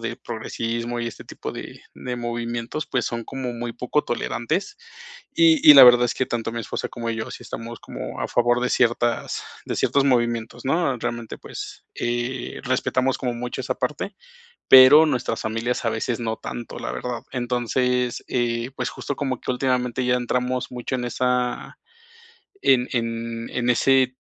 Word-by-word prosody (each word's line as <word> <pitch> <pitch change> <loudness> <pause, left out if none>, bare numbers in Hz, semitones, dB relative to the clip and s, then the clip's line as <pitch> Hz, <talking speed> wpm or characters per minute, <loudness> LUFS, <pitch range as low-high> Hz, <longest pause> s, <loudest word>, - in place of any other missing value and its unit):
de 115 +1 -4
progresismo 115 0 -4
y 120 - -2
este - - -11
tipo - - -7
de - - -8
de 125 -1 -5
movimientos, 120 +4 -3
pues, 125 -3 -1
son 115 -1 -3
como 130 -2 -4
muy 120 0 -4
poco 125 +5 0
tolerantes. 155 - -2 0.6
Y 325 -2 +5
y - - +11
la - - +12
verdad 120 0 +8
es 120 - -1
que 130 - -1
tanto 115 -1 -3
mi 115 - -3
esposa - - -4
como 115 -1 -5
yo 110 -1 -4
sí - - -8
estamos 115 +1 -7
como - - -7
a - - -2
favor 120 0 +2
de 125 - 0
ciertas 120 -1 +1 0.2
de - - -2
ciertos 140 -1 +2
movimientos, 120 -2 0
¿no? 135 -4 +1
Realmente, 120 -1 -4
pues, - - -8
eh, 120 +1 -3
respetamos 130 +1 0
como 125 -2 -2
mucho 125 +1 -4
esa - - -2
parte, - - -3 0.6
pero 130 +4 +10
nuestras 125 -6 -1
familias 115 +3 -2
a - - +3
veces 115 +1 -2
no 110 -1 -2
tanto, 120 - -7
la - - -4
verdad. 125 -1 -4
Entonces, 125 0 0
eh, 120 0 -1
pues, - - -2
justo 140 - -5
como 130 -3 -2
que - - -2
últimamente 125 -1 0
ya 125 0 +3
entramos 125 +1 -1
mucho 125 +1 -3
en 125 -1 -3
esa 125 0 -1 0.8
en 125 -2 +4
en 115 -1 -3
en 125 -1 -1
ese 130 0 +3
120 Hz, 170 wpm, -23 LUFS, 120-130 Hz, 0.8 s, la